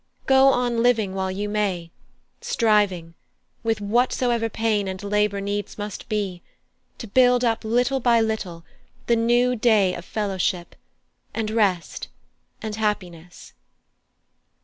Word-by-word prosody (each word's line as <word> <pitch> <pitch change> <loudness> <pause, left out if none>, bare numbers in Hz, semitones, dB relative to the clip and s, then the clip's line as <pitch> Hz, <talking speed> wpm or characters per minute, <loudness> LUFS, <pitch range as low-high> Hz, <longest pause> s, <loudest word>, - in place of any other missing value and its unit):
Go 265 0 +5
on 245 -3 +2
living 225 -5 +2
while 190 0 -2
you 200 +2 -3
may, 195 -5 -2 0.5
striving, 210 - +1 0.5
with 225 -2 0
whatsoever 235 +1 +1
pain 215 -2 0
and 190 +1 -5
labour 210 0 +1
needs 205 0 -4
must 205 -1 -6
be, 200 -5 -2 0.6
to - - -7
build 250 +2 +4
up 225 -1 0
little 245 +4 +1
by 235 -2 +3
little 210 -7 -3 0.4
the 235 - +3
new 240 +2 +2
day 215 -5 +3
of 175 - -7
fellowship, 190 -4 -2 0.6
and 220 -1 -2
rest, 200 -6 0 0.6
and 215 -1 -4
happiness." 180 -6 -4
215 Hz, 125 wpm, -23 LUFS, 195-235 Hz, 0.6 s, Go